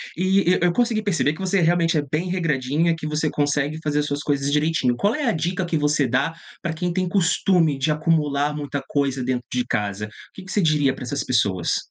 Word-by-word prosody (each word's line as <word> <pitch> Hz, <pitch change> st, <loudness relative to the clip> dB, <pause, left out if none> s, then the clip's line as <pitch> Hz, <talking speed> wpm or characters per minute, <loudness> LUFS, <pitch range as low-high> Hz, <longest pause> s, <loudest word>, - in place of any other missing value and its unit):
E 185 Hz, +3 st, +1 dB
e -, -, +3 dB
eu 175 Hz, 0 st, +3 dB
consegui 230 Hz, +1 st, +1 dB
perceber 175 Hz, -8 st, +1 dB
que -, -, -12 dB
você 190 Hz, +1 st, +1 dB
realmente 170 Hz, 0 st, +2 dB
é -, -, +2 dB
bem 170 Hz, +4 st, -1 dB
regradinha, 165 Hz, -2 st, 0 dB
que 160 Hz, -, -8 dB
você 150 Hz, 0 st, 0 dB
consegue 145 Hz, +1 st, 0 dB
fazer 150 Hz, -1 st, 0 dB
as 145 Hz, -, 0 dB
suas 145 Hz, 0 st, -3 dB
coisas 140 Hz, -1 st, -1 dB
direitinho, 150 Hz, -4 st, +1 dB
qual 205 Hz, -, +1 dB
é 300 Hz, -, -2 dB
a 235 Hz, -, +3 dB
dica 180 Hz, +2 st, -1 dB
que 170 Hz, -2 st, -1 dB
você 150 Hz, -2 st, +1 dB
dá 125 Hz, +6 st, 0 dB, 0.3 s
pra 170 Hz, -, -2 dB
quem 175 Hz, +2 st, -2 dB
tem 185 Hz, 0 st, 0 dB
costume 175 Hz, -4 st, +2 dB
de 140 Hz, +3 st, 0 dB
acumular 150 Hz, -2 st, +1 dB
muita 145 Hz, -1 st, -4 dB
coisa 140 Hz, -2 st, -1 dB
dentro 125 Hz, -1 st, -2 dB
de 125 Hz, -1 st, -1 dB
casa? 105 Hz, -2 st, -2 dB
O -, -, -11 dB, 0.2 s
que 190 Hz, -, -10 dB
que 195 Hz, -, -9 dB
você 210 Hz, -, +1 dB
diria 150 Hz, -5 st, +2 dB
pra -, -, -8 dB
essas 135 Hz, +3 st, -3 dB
pessoas? 100 Hz, -8 st, +1 dB
150 Hz, 225 wpm, -22 LUFS, 140-175 Hz, 0.3 s, e